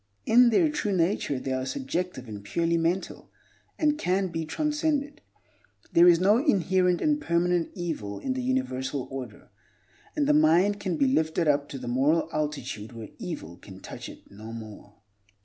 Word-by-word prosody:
In 240 Hz, +2 st, +6 dB
their 315 Hz, +8 st, +4 dB
true 300 Hz, -9 st, -1 dB
nature 165 Hz, -5 st, 0 dB
they 130 Hz, 0 st, -3 dB
are 130 Hz, 0 st, -1 dB
subjective 180 Hz, -, -3 dB
and 105 Hz, -2 st, -8 dB
purely 165 Hz, -, 0 dB
mental, 170 Hz, +3 st, -2 dB, 0.5 s
and 300 Hz, -1 st, +1 dB
can 190 Hz, -2 st, 0 dB
be 165 Hz, -1 st, -3 dB
transcended. 300 Hz, -, -1 dB, 0.7 s
There 170 Hz, +1 st, +7 dB
is 170 Hz, -1 st, +6 dB
no 205 Hz, +5 st, +4 dB
inherent 185 Hz, -, +2 dB
and 300 Hz, -1 st, +1 dB
permanent 170 Hz, -, +1 dB
evil 155 Hz, -, -4 dB
in 260 Hz, -, -2 dB
the 260 Hz, -, -3 dB
universal 140 Hz, -, -2 dB
order; 130 Hz, -2 st, -8 dB, 0.7 s
and 300 Hz, -2 st, +1 dB
the 300 Hz, -, +3 dB
mind 200 Hz, -, +4 dB
can 185 Hz, -4 st, -2 dB
be 275 Hz, -, +3 dB
lifted 160 Hz, -9 st, +1 dB
up 145 Hz, -1 st, +2 dB
to 135 Hz, -, -6 dB
the 125 Hz, -2 st, -7 dB
moral 145 Hz, +7 st, +2 dB
altitude 135 Hz, -7 st, -4 dB
where 115 Hz, -2 st, -8 dB
evil 85 Hz, +2 st, -6 dB
can 95 Hz, +1 st, -13 dB
touch -, -, -8 dB
it -, -, -15 dB
no 110 Hz, +3 st, -10 dB
more. 110 Hz, -2 st, -10 dB
170 Hz, 165 wpm, -27 LUFS, -, 0.7 s, There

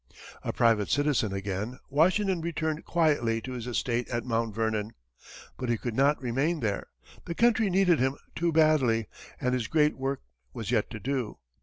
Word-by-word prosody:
A -, -, -2 dB
private 115 Hz, -3 st, +2 dB
citizen 145 Hz, -7 st, +1 dB
again, 100 Hz, +5 st, -3 dB
Washington 185 Hz, +5 st, +3 dB
returned 160 Hz, -1 st, -2 dB
quietly 145 Hz, -9 st, +2 dB
to 130 Hz, -, -7 dB
his 125 Hz, -2 st, -5 dB
estate 120 Hz, 0 st, -1 dB
at 120 Hz, 0 st, -2 dB
Mount 115 Hz, -3 st, -1 dB
Vernon. 110 Hz, -1 st, -1 dB, 0.6 s
But 125 Hz, -, -3 dB
he 120 Hz, -, +2 dB
could 120 Hz, +1 st, -4 dB
not 140 Hz, +5 st, +3 dB
remain 135 Hz, +7 st, 0 dB
there 105 Hz, -4 st, -2 dB, 0.4 s
the 170 Hz, -, -4 dB
country 230 Hz, -1 st, +3 dB
needed 180 Hz, -3 st, +3 dB
him 130 Hz, +2 st, +1 dB, 0.2 s
too 170 Hz, 0 st, +1 dB
badly, 145 Hz, -9 st, +3 dB, 0.3 s
and 125 Hz, 0 st, 0 dB
his 125 Hz, -4 st, -1 dB
great 150 Hz, +3 st, +3 dB
work 135 Hz, +1 st, -3 dB, 0.3 s
was 110 Hz, 0 st, -4 dB
yet 115 Hz, -4 st, +1 dB
to 110 Hz, -, -7 dB
do. 130 Hz, -1 st, -2 dB
130 Hz, 170 wpm, -28 LUFS, 115-155 Hz, 0.6 s, Washington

